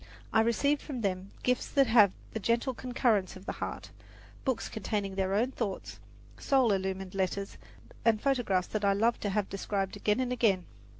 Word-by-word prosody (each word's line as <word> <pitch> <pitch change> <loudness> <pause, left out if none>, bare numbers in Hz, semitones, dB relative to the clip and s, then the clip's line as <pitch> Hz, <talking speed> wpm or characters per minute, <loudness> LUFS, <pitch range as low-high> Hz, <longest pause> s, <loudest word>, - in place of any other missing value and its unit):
I 220 - +6
received 280 +6 +2
from 265 -5 -5
them 190 -2 -2
gifts 250 0 +1
that 275 -1 +4
have 220 -5 +6 0.2
the 220 - -2
gentle 235 +5 +1
concurrence 240 -6 0
of 185 +1 -12
the - - -2
heart, - - -5 0.5
books 260 -4 -1
containing 205 -2 -3
their 190 0 0
own 240 +5 +2
thoughts, 210 -7 -4 0.4
soul 265 -5 +3
illumined 190 -1 -2
letters, 195 +1 -2 0.4
and 225 -2 +4
photographs 230 -9 +1
that 215 -1 -2
I 200 0 +4
love 225 +4 +2
to 205 - -2
have 200 0 0
described 195 0 -2
again 210 +2 +1
and 250 -1 0
again. 205 -7 +2
210 Hz, 175 wpm, -30 LUFS, 195-245 Hz, 0.5 s, I